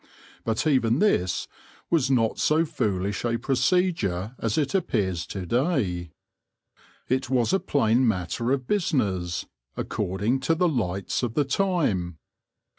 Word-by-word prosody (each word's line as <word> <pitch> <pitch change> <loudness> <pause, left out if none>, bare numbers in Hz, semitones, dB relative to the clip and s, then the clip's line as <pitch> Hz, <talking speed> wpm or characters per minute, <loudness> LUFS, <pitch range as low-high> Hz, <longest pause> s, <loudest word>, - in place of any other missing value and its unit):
But 115 +4 -1
even 130 -6 +3
this 95 - +1 0.4
was 150 -6 +3
not 115 -4 +2
so 160 +2 +3
foolish 100 - -2
a 115 -1 0
procedure 125 - 0
as 115 -2 -1
it 145 -3 0
appears 95 - 0
to 95 -2 -5
day. 110 - 0 1.0
It 130 0 0
was 130 +4 +2
a 195 - +4
plain 125 -4 +2
matter 110 +4 -1
of 135 -1 +1
busi 195 -1 0
ness, 90 - -1 0.3
according 105 +8 -1
to 150 +5 +1
the 180 +2 +2
lights 100 - -1
of 120 -3 -2
the 145 - +2
time. 135 - 0
120 Hz, 135 wpm, -25 LUFS, 95-145 Hz, 1.0 s, a